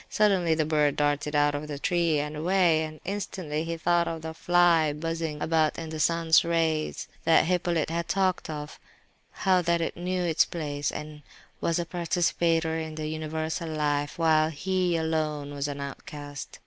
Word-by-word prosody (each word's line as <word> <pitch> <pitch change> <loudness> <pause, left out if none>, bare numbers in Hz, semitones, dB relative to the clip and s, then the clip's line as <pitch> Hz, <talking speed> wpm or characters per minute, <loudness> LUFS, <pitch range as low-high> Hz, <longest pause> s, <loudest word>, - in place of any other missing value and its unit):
Suddenly 190 -6 +3
the 155 -1 +1
bird 150 -2 +2
darted 145 0 0
out 145 0 +3
of 145 +1 -4
the 145 -1 -5
tree 170 +1 +1
and 150 +1 -3
away, 170 0 +3
and 155 0 -9
instantly 185 -6 -3
he 165 0 -3
thought 170 +1 +2
of 165 -1 -4
the 160 0 -5
"fly 170 -2 +3
buzzing 165 0 -3
about 155 -1 +1
in 165 -1 -5
the 155 - -5
sun's 165 +2 +4
rays" 165 -2 0 0.2
that 165 - +5
Hippolyte 175 -2 0
had 170 0 -2
talked 190 -3 0
of; 150 -1 -6 0.5
how 185 -2 +2
that 170 0 +1
it 165 - -2
knew 180 +1 -2
its 165 -2 +3
place 145 -4 -3
and 150 0 -7 0.4
was 165 - 0
a 175 - -1
participator 165 -1 0
in 160 -1 -5
the 155 0 -4
universal 160 +1 -3
life, 145 0 -1
while 160 -2 +3
he 180 +2 0
alone 155 -3 -2
was 140 0 -2
an 145 -1 -5
"outcast." 145 0 -7
160 Hz, 175 wpm, -27 LUFS, 150-170 Hz, 0.5 s, that